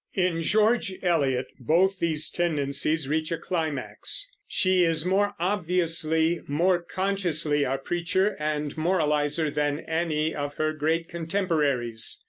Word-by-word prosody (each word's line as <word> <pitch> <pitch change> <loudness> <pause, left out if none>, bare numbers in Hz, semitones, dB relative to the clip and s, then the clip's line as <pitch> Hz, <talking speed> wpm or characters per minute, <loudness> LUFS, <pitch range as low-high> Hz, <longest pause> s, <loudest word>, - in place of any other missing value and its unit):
In 180 -3 +1
George 215 +2 +2
Eliot 140 -8 +1
both 180 +9 +2
these 155 -2 0
tendencies 150 -2 0
reach 155 +2 -1
a 165 - 0
climax. 165 - -2
She 185 -1 +2
is 165 -1 +2
more 200 +2 +1
obviously, 170 -3 +1
more 175 +5 +2
consciously 170 -6 0
a 135 +1 -1
preacher 175 +7 0
and 150 -1 -2
moralizer 155 -2 +1
than 145 +1 -1
any 160 -1 -1
of 145 0 -4
her 155 0 0
great 160 +2 -1
contemporaries. 160 - 0
160 Hz, 120 wpm, -26 LUFS, 150-180 Hz, -, George